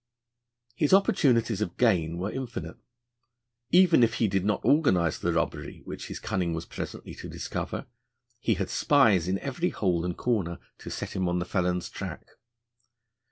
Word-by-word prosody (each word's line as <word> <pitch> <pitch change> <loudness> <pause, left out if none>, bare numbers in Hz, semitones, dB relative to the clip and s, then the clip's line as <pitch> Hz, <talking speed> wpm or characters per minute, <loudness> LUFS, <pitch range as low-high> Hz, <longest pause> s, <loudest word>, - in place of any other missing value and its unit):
His 150 +7 +4
opportunities 125 - +2
of 105 - -3
gain 85 -9 +2
were 95 +4 -2
infinite. 130 -3 -5 0.9
Even 175 -4 +6
if 115 0 +3
he 115 - +2
did 95 -1 0
not 105 -1 0
organise 95 - +3
the 85 - 0
robbery 80 -3 -2
which - - -7
his - - -6
cunning 85 -3 -1
was 80 +1 -5
presently - - -7
to - - -9
discover, - - -4 0.5
he 115 -2 +1
had 95 0 -3
spies 110 - +4
in 95 +1 +1
every 145 - -2
hole 90 -4 0
and 90 0 -3
corner 100 -9 -1 0.2
to - - -8
set - - -5
him 95 -2 0
on 90 - 0
the 90 - -1
felon's 90 -2 0
track. - - -7
100 Hz, 160 wpm, -27 LUFS, 90-125 Hz, 0.9 s, Even